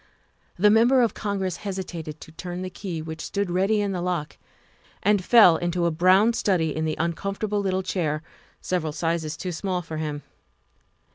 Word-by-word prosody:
The 205 +3 +5
Member 240 +4 +5
of 230 - +1
Congress 195 -4 -2
hesitated 180 -6 -6
to - - -11
turn 180 +2 -6
the 185 - -5
key 175 -3 -5
which 160 0 -7
stood 200 -3 -2
ready 195 +4 +2
in 200 -1 -1
the 180 -2 -3
lock, 175 -4 -3 0.7
and 205 -1 +3
fell 195 -7 +7
into 175 0 -1
a 170 - +2
brown 185 +7 +4
study 175 -9 0
in 160 0 -1
the 155 - -2
uncomfortable 195 +5 -2
little 190 -1 0
chair, 155 -5 -2 0.4
several 160 -4 -2
sizes 165 -1 -2
too 185 - -4
small 180 +1 -2
for 160 -1 -6
him. 150 -2 -4
180 Hz, 170 wpm, -25 LUFS, 160-200 Hz, 0.7 s, fell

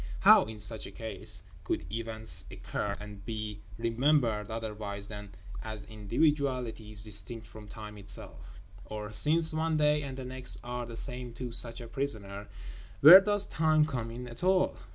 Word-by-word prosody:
How, - - +8
in 110 0 -8
such 105 +1 -6
a - - -10
case, 105 -2 -3 0.2
could - - -2
events 110 -1 +1
occur 100 -1 -4
and 105 -1 -10
be 105 -1 -5 0.2
remembered 115 -2 +1
otherwise 105 -3 -5
than 105 -1 -8 0.3
as 110 -2 -6
individualities 115 -1 -1
distinct 110 +2 -4
from 110 -1 -12
Time 105 0 -9
Itself? 95 -1 -6 0.3
Or, 105 0 -6
since 160 +7 +4
one 160 0 0
day 150 0 +3
and 135 -2 -6
the 130 - -6
next 130 0 +1
are 120 0 -4
the 115 - -8
same 125 0 -1
to 120 +1 -6
such 115 +1 -5
a 120 - -8
prisoner, 105 -7 -2 0.5
where 175 +7 +12
does 205 0 +2
Time 155 -1 +3
come 125 -7 -3
in 125 +2 -7
at 120 +6 -8
all? 185 0 +3
115 Hz, 160 wpm, -30 LUFS, 105-135 Hz, 0.5 s, where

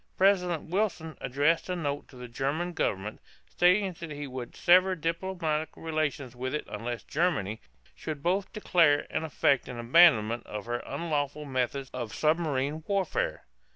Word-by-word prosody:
President 180 -5 +2
Wilson 180 -5 -1
addressed 145 +7 +1
a 180 - 0
note 145 -4 -3
to - - -16
the 125 0 -8
German 145 +9 -2
government, 105 - -2 0.3
stating 185 +2 +3
that 165 - -6
he 145 -1 -5
would 125 -3 -7
sever 185 +2 +5
diplomatic 165 -2 -2
relations 155 -6 -2
with 130 +3 -3
it 150 - -3
unless 115 +1 -5
Germany 140 - -1 0.3
should 150 -3 -6
both 190 +3 0
declare 165 -8 +3
and - - -1
effect 140 -3 +2
an 125 -1 -6
abandonment 120 -3 +5
of 105 -1 -6
her 120 +1 -2
unlawful 150 -3 -2
methods 130 0 -2
of 120 -4 -5
submarine 155 -2 0
warfare. 475 - -1
150 Hz, 150 wpm, -29 LUFS, 130-175 Hz, 0.3 s, sever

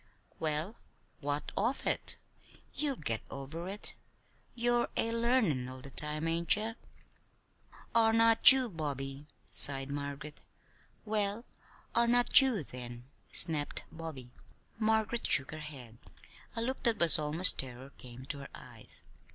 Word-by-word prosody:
"Well, 155 +7 -2 0.4
what 145 +1 -4
of 235 +7 -2
it? - - 0 0.6
You'll 290 -3 -2
get 115 - -3
over 150 +6 -8
it. 205 +2 0 0.6
You're 240 0 0
a 230 - 0
learnin' 230 - 0
all 130 0 -10
the 140 - -11
time; 150 +3 +2
ain't 165 0 +4
ye?" 220 +2 -4 1.2
"'Are 225 -1 +4
not 225 +2 +8
you,' 265 -1 +2
Bobby," 145 - -6 0.2
sighed 135 0 +3
Margaret. 145 +1 -7 0.7
"Well, 210 +1 -2 0.5
'are 235 0 +2
not 245 +3 +5
you,' 250 - 0
then," 125 0 -10 0.2
snapped 155 -4 +4
Bobby. 155 -7 -9 0.5
Margaret 220 +1 0
shook 135 - +1
her 155 - -8
head. 130 -7 -10 0.6
A 230 - -2
look 260 +3 -4
that 230 -2 +1
was 170 -2 +6
almost 155 +4 +3
terror 130 +1 -8
came 125 +1 -12
to 140 +1 -3
her 140 - -10
eyes. - - -8
160 Hz, 135 wpm, -31 LUFS, 140-225 Hz, 1.2 s, not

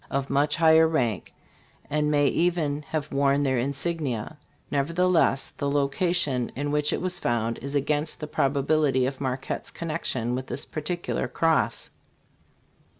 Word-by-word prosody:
83 - - -2
of 140 0 -3
much 145 +2 +2
higher 160 0 +6
rank, 120 - -1 0.6
and 150 0 0
may 145 -1 +3
even 155 -1 +1
have 150 -2 -3
worn 140 +1 +2
their 130 -3 +1
insignia, 140 -1 -2 0.3
nevertheless 165 0 +2
the 140 - -1
location 140 -2 +1
in 145 +2 -2
which 150 0 +1
it - - -1
was 180 -1 -1
found 115 -1 -1
is 140 +3 -5
against 150 +2 0
the 150 - -4
probability 140 -1 +1
of 135 +1 -4
Marquette's 130 -1 -3
connection 155 -7 -2
with 130 +1 -3
this - - -4
particular 170 +3 -3
cross. 165 -1 0
145 Hz, 145 wpm, -26 LUFS, 135-160 Hz, 0.6 s, higher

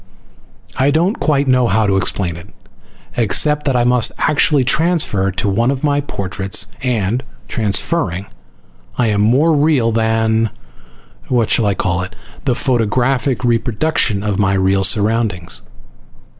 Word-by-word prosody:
I 135 +2 +2
don't 170 +8 +1
quite 145 -3 +1
know 125 -2 +3
how 110 0 +1
to 100 -1 +1
explain 95 -2 -1
it, 85 - -12 0.7
except 150 +7 +1
that 135 - +1
I 120 - +2
must 125 -2 +3
actually 145 -1 +2
transfer 140 - +1
to 95 +2 -3
one 115 +5 +1
of 135 0 -2
my 145 -1 +1
portraits, 100 -6 -1 0.2
and, 120 -2 -1 0.3
transferring, 100 - -1 0.7
I 125 - +2
am 105 -1 +1
more 135 +10 +3
real 145 -6 +2
than 110 0 +1 0.8
what 120 -3 0
shall 110 - +2
I 100 - 0
call 90 -1 -1
it? 95 +2 -7 0.3
the 125 -3 +1
photographic 125 +2 0
reproduction 120 -2 0
of 105 -2 -2
my 100 -1 +2
real 95 0 +1
surroundings. 105 -3 0
115 Hz, 140 wpm, -16 LUFS, 100-135 Hz, 0.8 s, know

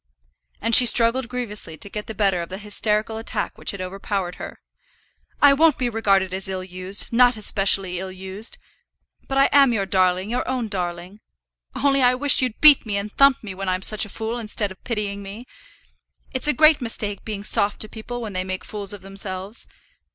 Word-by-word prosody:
And 230 +2 -1
she 245 +2 +10
struggled 235 +2 +4
grievously 215 -9 -6
to - - -7
get 210 +1 -7
the 220 - -7
better 195 -3 +1
of 170 - -7
the 190 - -6
hysterical 210 +1 -1
attack 225 - -4
which - - -4
had 200 - -4
overpowered 190 -1 -4
her. - - -9 0.8
"I 285 -1 +7
won't 310 0 +3
be 250 -2 -1
regarded 195 -5 0
as 190 0 -3
ill 190 -1 -5
used; 185 +4 -3
not 245 0 +4
as 215 - -3
specially 195 -2 +2
ill 190 0 -6
used. 190 +3 -4 0.7
But 270 - -3
I 275 - +5
am 275 -3 +5
your 200 -3 -1
darling, 185 +1 0
your 250 +1 -2
own 250 -4 -3
darling. 180 0 -5 0.6
Only 275 -1 +1
I 250 0 +4
wish 280 +1 +3
you'd 250 -4 -3
beat 300 -3 +7
me 205 -3 -3
and 200 +1 -5
thump 275 -2 +3
me 200 -3 -7
when 190 0 -5
I'm 185 +1 -2
such 215 +1 +4
a 210 - -6
fool, 225 +3 -5
instead 210 -2 -2
of 190 - -15
pitying 210 -4 -4
me. 200 +5 -10 0.9
It's 260 +2 0
a - - +4
great 310 +2 +4
mistake 210 -4 -3
being 210 -2 -6
soft 205 0 +2
to 215 - -2
people 240 +3 -8
when 215 -3 -7
they 185 0 -2
make 185 0 -6
fools 205 -2 -4
of 200 -2 -11
themselves. 195 +1 -4
210 Hz, 205 wpm, -21 LUFS, 190-240 Hz, 0.9 s, she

